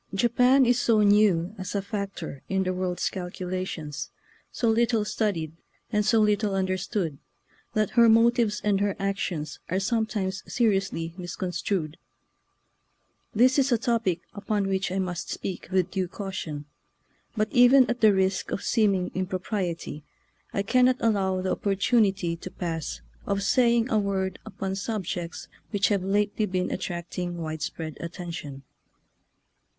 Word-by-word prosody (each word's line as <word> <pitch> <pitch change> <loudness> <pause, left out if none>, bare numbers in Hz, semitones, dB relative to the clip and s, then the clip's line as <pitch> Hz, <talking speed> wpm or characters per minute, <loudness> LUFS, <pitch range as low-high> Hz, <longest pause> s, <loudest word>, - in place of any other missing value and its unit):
Japan 250 +4 +4
is 245 0 +3
so 225 -3 +3
new 205 -3 +4
as 185 +1 -5
a 200 - +1
factor 195 -8 -5
in 190 0 +1
the 185 0 -1
world's 180 -1 -1
calculations, 180 -4 -4 0.4
so 235 - -1
little 225 -1 +2
studied, 195 -8 -1 0.4
and 210 -1 +2
so 225 +2 +3
little 210 -1 +2
understood, 185 -4 -1 0.5
that 215 -2 +1
her 235 -1 +6
motives 230 -2 +4
and 200 -2 +2
her 200 -1 +1
actions 195 -6 -3
are 185 - +1
sometimes 205 -3 -1
seriously 195 -7 0
mis 175 -1 -5
construed. 175 -3 -2 1.4
This 255 +5 +5
is 270 0 +2
a 240 - +4
topic 225 -6 0
upon 205 -1 -1
which 190 -1 -1
I 190 - -1
must 180 -3 -3
speak 185 - -5
with 185 -1 +1
due 190 -2 -1
caution, 175 -7 -5 0.7
but 215 0 0
even 250 +1 +7
at 240 0 -2
the 215 -1 +7
risk 190 -1 +1
of - - -3
seeming 200 -5 +2
impropriety 185 -4 -3 0.5
I 200 - -1
cannot 255 +4 +4
allow 190 -5 +1
the 185 - 0
opportunity 195 -3 +1
to 185 - -8
pass 165 -4 -4 0.3
of 200 -1 0
saying 235 +2 +3
a 220 - +4
word 190 -2 -1
upon 195 -2 -4
subjects 190 -5 -4 0.2
which 205 -2 +1
have 200 -3 +1
lately 205 +2 +1
been 185 -1 -1
attracting 175 -1 -4
widespread 160 0 -4
attention. 165 -5 -6
195 Hz, 140 wpm, -26 LUFS, 180-215 Hz, 1.4 s, even